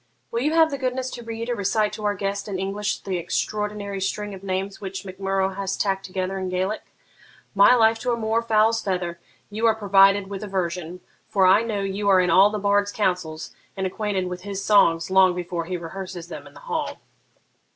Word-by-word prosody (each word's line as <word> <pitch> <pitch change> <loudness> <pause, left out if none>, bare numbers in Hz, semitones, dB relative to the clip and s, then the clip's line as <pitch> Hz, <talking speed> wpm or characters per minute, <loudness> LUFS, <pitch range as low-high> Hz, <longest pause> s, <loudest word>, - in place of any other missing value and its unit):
Will 235 - -1
you 300 +4 +1
have 325 -1 +5
the 280 - -3
goodness 255 0 -2
to 240 - -7
read 230 0 -5
or 245 - 0
recite 210 0 0
to 215 -1 -6
our 205 0 +1
guest 200 +1 -3
in 200 -2 -3
English 200 +2 -2
the 190 -2 -3
extraordinary 205 +2 -3
string 205 +1 -2
of 190 - -9
names 195 +1 -3
which 190 0 -6
Mac 190 0 -9
Murrough 195 0 0
has 195 -1 -3
tacked 195 -1 -1
together 185 +1 -3
in 185 -1 -3
Gaelic? 185 +4 -1 0.7
My 200 +5 +7
life 225 -1 +4
to 245 +1 -1
a 235 - 0
moor 225 0 0
fowl's 225 0 +2
feather, 180 -4 -2 0.3
you 220 +3 +1
are 220 - +4
provided 195 -1 +4
with 195 0 -6
a - - -5
version; 180 -2 -3 0.3
for 195 -2 +3
I 190 +3 +6
know 220 -3 -2
you 195 +1 -1
are 190 -1 +6
in 180 -2 +2
all 190 +4 +7
the 215 - -3
bard's 205 0 +1
councils, 180 -7 -2 0.2
and 190 - -1
acquainted 195 0 -2
with 180 0 -5
his 200 0 -5
songs 170 -5 +4
long 190 -1 +5
before 175 -1 -3
he 180 +1 -3
rehearses 175 0 -7
them 145 -4 -8
in 145 - -17
the 140 - -13
hall.' - - -3
195 Hz, 215 wpm, -24 LUFS, 185-210 Hz, 0.7 s, My